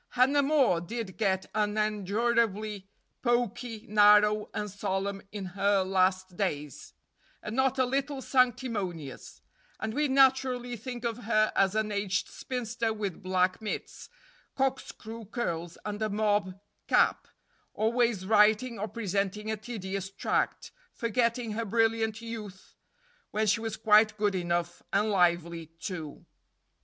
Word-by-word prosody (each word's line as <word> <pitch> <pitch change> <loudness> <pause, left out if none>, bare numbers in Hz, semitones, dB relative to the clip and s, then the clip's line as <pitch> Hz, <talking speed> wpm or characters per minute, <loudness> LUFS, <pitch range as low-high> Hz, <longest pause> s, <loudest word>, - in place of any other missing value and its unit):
Hannah 265 +3 +4
More 275 - +3
did 215 +1 -5
get 190 -3 0
unendurably 215 0 0 0.3
poky, 240 -2 -1
narrow, 210 0 +5
and 210 - -3
solemn 195 0 -3
in 205 -2 -5
her 200 0 +2
last 185 -1 +1
days, 150 - -4 0.5
and 215 - -5
not 265 0 +2
a 260 - +3
little 275 +2 -1
sanctimonious; 225 - -1 0.4
and 220 0 -3
we 295 +3 +1
naturally 260 -2 +3
think 240 +1 -7
of 235 0 -3
her 215 -1 +3
as 195 +1 +3
an 215 -1 0
aged 200 -2 -1
spinster 235 -2 -3
with 205 -5 -4
black 185 +1 +1
mitts, 215 - -6 0.5
corkscrew 240 -4 -3
curls, 175 -7 -4
and 210 0 -4
a 215 - 0
mob 205 -2 0 0.3
cap, - - +3 0.5
always 225 -3 +1
writing 215 +3 +3
or 215 - -2
presenting 210 -1 -2
a - - 0
tedious 195 -3 -5
tract, 195 - -1 0.2
forgetting 235 0 0
her 225 +2 -2
brilliant 225 0 +1
youth, 210 -5 -8 0.5
when 215 +1 0
she 215 +2 +2
was 225 -1 -4
quite 215 -1 +5
good 205 -1 +1
enough, 175 -1 -2
and 210 +2 +2
lively, 170 -3 +1
too. 165 -2 -7
215 Hz, 125 wpm, -29 LUFS, 195-235 Hz, 0.5 s, narrow